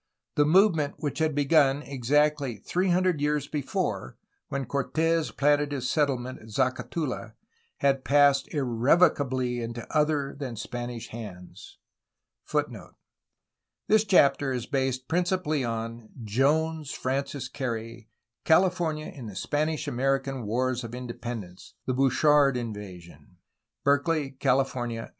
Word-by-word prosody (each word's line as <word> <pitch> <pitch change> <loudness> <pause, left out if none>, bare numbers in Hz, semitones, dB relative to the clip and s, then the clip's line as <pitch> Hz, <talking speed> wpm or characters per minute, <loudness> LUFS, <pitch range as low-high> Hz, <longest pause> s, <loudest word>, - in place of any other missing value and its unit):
The 145 - +3
movement 160 -3 +3
which 145 0 -3
had 155 -2 +1
begun 145 -1 +3
exactly 140 -1 +1
three 185 - -1
hundred 180 -3 +2
years 150 -1 0
before, 140 - -3 0.3
when 140 -1 -3
Cortes 160 +5 0
planted 145 0 +2
his 130 -3 -2
settlement 130 -4 0
at 110 - -14
Zacatula, 130 0 -2 0.5
had 135 -1 +2
passed 145 -1 +4
irrevocably 130 -1 +2
into 115 0 -5
other 150 -2 +1
than 135 -4 -5
Spanish 120 +2 -6
hands. 100 -6 -10 0.7
^ - - -2 0.5
' - - -60
This 215 0 +5
chapter 140 -8 +4
is 125 -2 -2
based 130 -1 -1
principally 175 -3 0
on: 115 -1 -4
Jones, 150 +7 +1
Frances 135 +1 -2
Carey. 115 -4 -5 0.3
California 165 -2 +2
in 125 -5 -8
the 100 - -9
Spanish 150 +8 -1
American 135 -1 -1
wars 125 +2 0
of 115 +1 -7
independence: 120 -5 -7
the 130 - 0
Bouchard 135 +1 +4
in 115 -3 -3
vasion. 90 -4 -11 0.5
Berkeley, 145 +1 +1
Cahfornia. 125 -3 -1
135 Hz, 120 wpm, -27 LUFS, 120-150 Hz, 0.7 s, This